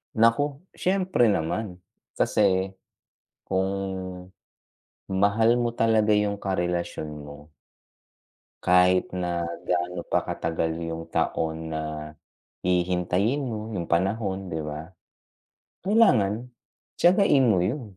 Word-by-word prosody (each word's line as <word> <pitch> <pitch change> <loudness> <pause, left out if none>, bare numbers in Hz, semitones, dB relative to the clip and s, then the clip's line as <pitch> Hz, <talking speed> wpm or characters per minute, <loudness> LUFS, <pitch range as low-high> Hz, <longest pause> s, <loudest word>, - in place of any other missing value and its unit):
Naku, 130 +6 +3 0.2
siyempre 185 - +2
naman. 90 +2 -2 0.4
Kasi, 95 -2 +2 0.7
kung 95 0 +1 1.4
mahal 105 +5 +3
mo 120 -1 -1
talaga 110 -2 +3
'yung 105 -1 0
karelasyon 90 -4 -2
mo, 75 +1 -11 1.1
kahit 90 0 +4
na 90 -1 -2 0.2
gaano 90 0 -1
pa - - +1
katagal 80 0 -2
'yung 80 0 -5
taon 80 0 -1
na 80 - -2 0.8
hihintayin 90 +8 +1
mo 110 -4 -4
'yung 85 - -2
panahon 95 +2 0
'di 80 -2 -3
ba? 75 +4 -7 0.9
Kailangan 125 - +3 0.5
tiyagain 175 -7 +5
mo 100 -5 +4
'yun. 125 +9 -1
95 Hz, 95 wpm, -26 LUFS, 85-115 Hz, 1.4 s, tiyagain